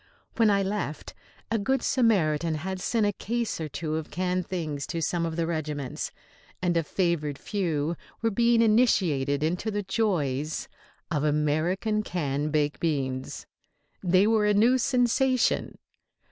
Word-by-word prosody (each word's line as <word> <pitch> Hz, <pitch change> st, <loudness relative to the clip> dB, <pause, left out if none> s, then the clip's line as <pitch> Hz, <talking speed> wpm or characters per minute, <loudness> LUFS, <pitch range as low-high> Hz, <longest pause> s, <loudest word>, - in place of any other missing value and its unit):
When 225 Hz, -2 st, +5 dB
I 200 Hz, -1 st, +3 dB
left, 195 Hz, -6 st, -3 dB, 0.4 s
a 225 Hz, -, +2 dB
good 265 Hz, +5 st, 0 dB
Samaritan 170 Hz, -, +2 dB
had 190 Hz, +4 st, -4 dB
sent 225 Hz, +1 st, +1 dB
a 205 Hz, -, +2 dB
case 230 Hz, -2 st, -2 dB
or 155 Hz, -, -3 dB
two 155 Hz, +1 st, -3 dB
of 160 Hz, -, -5 dB
canned 180 Hz, -1 st, -1 dB
things 155 Hz, -6 st, -3 dB
to 165 Hz, -, -3 dB
some 170 Hz, +1 st, 0 dB
of 160 Hz, -, -4 dB
the 165 Hz, 0 st, 0 dB
regiments, 150 Hz, -5 st, -3 dB, 0.5 s
and 175 Hz, -1 st, 0 dB
a 165 Hz, -, +3 dB
favoured 160 Hz, -4 st, -1 dB
few 165 Hz, -5 st, -1 dB, 0.3 s
were 225 Hz, -, +2 dB
being 235 Hz, +2 st, +4 dB
initiated 170 Hz, -, +2 dB
into 180 Hz, +7 st, -1 dB
the 205 Hz, -1 st, -2 dB
joys 160 Hz, -, -1 dB, 0.4 s
of 150 Hz, -3 st, 0 dB
American 155 Hz, +8 st, +1 dB
canned 150 Hz, -6 st, -2 dB
baked 150 Hz, -1 st, 0 dB
beans. 135 Hz, -5 st, -2 dB, 0.6 s
They 185 Hz, +1 st, +4 dB
were 215 Hz, -1 st, +3 dB
a 210 Hz, -, +3 dB
new 240 Hz, +5 st, +4 dB
sensation. 255 Hz, 0 st, +2 dB
175 Hz, 145 wpm, -27 LUFS, 150-210 Hz, 0.6 s, When